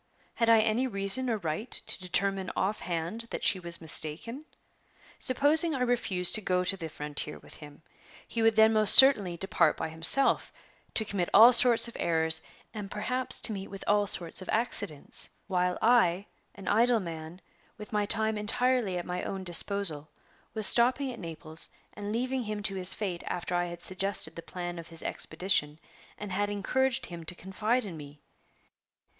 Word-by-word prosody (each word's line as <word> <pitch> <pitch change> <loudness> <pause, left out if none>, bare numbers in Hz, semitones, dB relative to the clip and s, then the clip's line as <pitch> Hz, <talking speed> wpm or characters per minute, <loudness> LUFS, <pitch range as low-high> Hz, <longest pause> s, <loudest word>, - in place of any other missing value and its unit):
Had 230 -1 0
I 225 -1 +5
any 225 +4 0
reason 200 +4 0
or 225 - -1
right 175 +6 -5
to - - -3
determine 190 +1 -1
offhand 190 +2 -3
that - - -6
she 190 - +2
was 170 -1 -3
mistaken? 165 - -1 0.8
Supposing 295 +5 +4
I 260 - -4
refused 225 -8 0
to 215 - +2
go 180 -2 -1
to 190 +2 +2
the 165 -4 -7
frontier 150 0 -5
with - - -16
him, 150 0 -14 0.4
he 230 - -4
would 225 0 +3
then 220 0 +4
most 215 -2 +5
certainly 210 -10 +7
depart 170 -3 +1
by 160 - -4
himself, 165 +12 +4 0.4
to 220 - +2
commit 195 -4 -3
all 235 +3 +8
sorts 235 -1 +4
of 235 - -12
errors, 160 -1 +1 0.3
and 210 -3 -7
perhaps 255 +6 -2
to - - +3
meet 195 -1 -7
with 195 0 -10
all 205 0 +1
sorts 170 -1 -3
of 185 - -11
accidents; 205 -9 0 0.2
while 180 -1 -1
I, 205 -6 +2 0.3
an 195 -1 -12
idle 235 +2 +2
man, 165 -1 -8 0.4
with 210 0 -11
my 210 -1 -1
time 220 0 -2
entirely 235 -2 0
at 175 - -5
my 180 0 -4
own 195 -1 -6
disposal, 175 -4 0 0.5
was 215 -1 -1
stopping 255 +4 +4
at 240 - -10
Naples, 160 -2 -4 0.2
and 205 0 -7
leaving 255 +3 -2
him 210 -2 -6
to 195 - -1
his 185 -1 -1
fate 185 -5 -5
after 175 0 -5
I 175 0 0
had 175 0 -8
suggested 185 -3 0
the 170 - -8
plan 175 0 -7
of 165 - -10
his 165 -1 -6
expedition, 155 -3 +1 0.4
and 210 -2 -8
had 205 +2 -1
encouraged 240 +6 -1
him 170 -1 -10
to 175 - -7
confide 215 +7 -2
in 175 -5 -8
me. 145 0 -12
195 Hz, 175 wpm, -28 LUFS, 175-225 Hz, 0.8 s, all